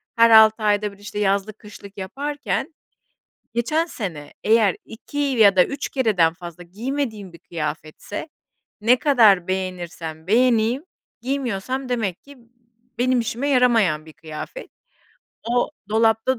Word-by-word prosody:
her 230 Hz, 0 st, +6 dB
6 220 Hz, 0 st, +7 dB
ayda 210 Hz, 0 st, +1 dB
bir, -, -, -17 dB
işte, 205 Hz, +1 st, -7 dB
yazlık, 200 Hz, +1 st, 0 dB
kışlık 205 Hz, -1 st, -13 dB
yaparken 285 Hz, -, -4 dB, 0.8 s
geçen 305 Hz, +8 st, 0 dB
sene 165 Hz, -, -7 dB
eğer 215 Hz, -3 st, +4 dB
2 225 Hz, +6 st, -9 dB
ya 230 Hz, -9 st, +4 dB
da 180 Hz, -, +7 dB
3 280 Hz, 0 st, -5 dB
kereden 205 Hz, -, +2 dB
fazla 175 Hz, 0 st, -10 dB
giymediğim 215 Hz, 0 st, -4 dB
bir 170 Hz, -, -14 dB
kıyafetse, 160 Hz, -, -6 dB, 0.5 s
ne 240 Hz, +4 st, +4 dB
kadar 215 Hz, -, +4 dB
beğenirsem 175 Hz, -4 st, -5 dB
beğeneyim 235 Hz, -, +2 dB, 0.4 s
giymiyorsam 255 Hz, 0 st, -3 dB
demek 220 Hz, -8 st, -2 dB
ki 285 Hz, 0 st, -15 dB, 0.6 s
benim 250 Hz, 0 st, +2 dB
işime 235 Hz, +5 st, -2 dB
yaramayan 225 Hz, -, +3 dB
bir 155 Hz, -, -12 dB
kıyafet. 160 Hz, -, -9 dB, 0.8 s
O 245 Hz, +3 st, +1 dB, 0.2 s
dolapta 225 Hz, +3 st, +2 dB
220 Hz, 125 wpm, -22 LUFS, 185-250 Hz, 0.8 s, 6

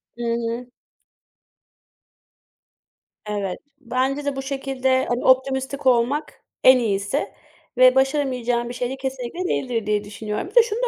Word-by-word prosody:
I 240 Hz, -, -9 dB
hı. 235 Hz, +1 st, -2 dB, 2.5 s
Evet. 205 Hz, -3 st, -3 dB, 0.2 s
Bence 265 Hz, +3 st, -1 dB
de, 285 Hz, -1 st, -1 dB
bu 270 Hz, -, -3 dB
şekilde, 270 Hz, -1 st, 0 dB
hani, 240 Hz, +1 st, -2 dB
optimistik 265 Hz, +1 st, +2 dB
olmak 255 Hz, +4 st, +1 dB, 0.2 s
en 260 Hz, 0 st, +8 dB
iyisi 205 Hz, +4 st, -1 dB, 0.4 s
ve 255 Hz, 0 st, +7 dB
başaramayacağın 255 Hz, -4 st, +1 dB
bir 245 Hz, -, -5 dB
şey 245 Hz, 0 st, -2 dB
de, 265 Hz, -, -5 dB
kesinlikle 265 Hz, +6 st, -4 dB
değildir 240 Hz, -, -1 dB
diye 210 Hz, 0 st, 0 dB
düşünüyorum. 210 Hz, +1 st, -5 dB
Bir 415 Hz, -, -19 dB
de, 475 Hz, -, +8 dB
şunu 455 Hz, 0 st, -3 dB
255 Hz, 130 wpm, -22 LUFS, 235-270 Hz, 2.5 s, en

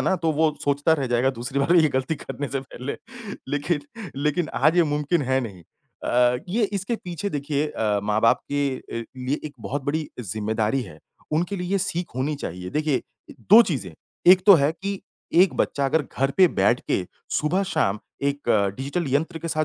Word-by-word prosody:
ना, -, -, +2 dB
तो 165 Hz, -2 st, 0 dB
वो 155 Hz, 0 st, +2 dB
सोचता 145 Hz, +3 st, +2 dB
रह 145 Hz, -4 st, +1 dB
जाएगा 120 Hz, +2 st, +2 dB
दूसरी 130 Hz, +2 st, -4 dB
बार 165 Hz, +6 st, +3 dB
ये 160 Hz, -3 st, +6 dB
गलती 130 Hz, +3 st, -1 dB
करने 145 Hz, -1 st, -6 dB
से 135 Hz, -1 st, -2 dB
पहले, 130 Hz, 0 st, -6 dB, 0.5 s
लेकिन 145 Hz, +3 st, 0 dB, 0.4 s
लेकिन 150 Hz, +4 st, 0 dB
आज 160 Hz, +3 st, +3 dB
ये 175 Hz, -, +6 dB
मुमकिन 150 Hz, +2 st, 0 dB
है 130 Hz, +1 st, +1 dB
नहीं। 100 Hz, -8 st, -7 dB, 0.4 s
अ, 125 Hz, 0 st, +3 dB
ये 220 Hz, +5 st, 0 dB
इसके 200 Hz, +4 st, -2 dB
पीछे 185 Hz, +2 st, -5 dB
देखिए 145 Hz, 0 st, -1 dB
अ, 105 Hz, -6 st, 0 dB
माँ-बाप 110 Hz, +5 st, +3 dB
के 145 Hz, 0 st, +1 dB, 0.4 s
अ, -, -, -6 dB
लिए 130 Hz, +3 st, -2 dB
एक 150 Hz, -, -5 dB
बहुत 140 Hz, +1 st, -3 dB
बड़ी 155 Hz, +1 st, -1 dB
ज़िम्मेदारी 110 Hz, +4 st, -1 dB
है, 80 Hz, -8 st, -11 dB, 0.3 s
उनके 175 Hz, +6 st, 0 dB
लिए 180 Hz, -1 st, -4 dB
ये 200 Hz, -, +3 dB
सीख 175 Hz, -3 st, -3 dB
होनी 140 Hz, +4 st, 0 dB
चाहिए, 90 Hz, +1 st, -5 dB
देखिए 150 Hz, -3 st, +1 dB
अ, 325 Hz, -3 st, -17 dB, 0.2 s
2 220 Hz, +3 st, +11 dB
चीज़ें, 140 Hz, -, -3 dB, 0.3 s
एक 185 Hz, +1 st, +8 dB
तो 200 Hz, -, +10 dB
है 150 Hz, -1 st, +3 dB
कि 195 Hz, +3 st, -5 dB, 0.3 s
एक 180 Hz, 0 st, +5 dB
बच्चा 140 Hz, -, 0 dB
अगर 150 Hz, +3 st, +2 dB
घर 135 Hz, +1 st, +2 dB
पे 185 Hz, -1 st, +7 dB
बैठ 105 Hz, +3 st, +2 dB
के 90 Hz, -, 0 dB, 0.3 s
सुबह-शाम 150 Hz, -, 0 dB, 0.2 s
एक 140 Hz, -2 st, -2 dB, 0.3 s
डिजिटल 145 Hz, +6 st, -2 dB
यंत्र 160 Hz, +3 st, 0 dB
के 165 Hz, -, -5 dB
साथ 155 Hz, -1 st, 0 dB
145 Hz, 190 wpm, -24 LUFS, 130-165 Hz, 0.5 s, 2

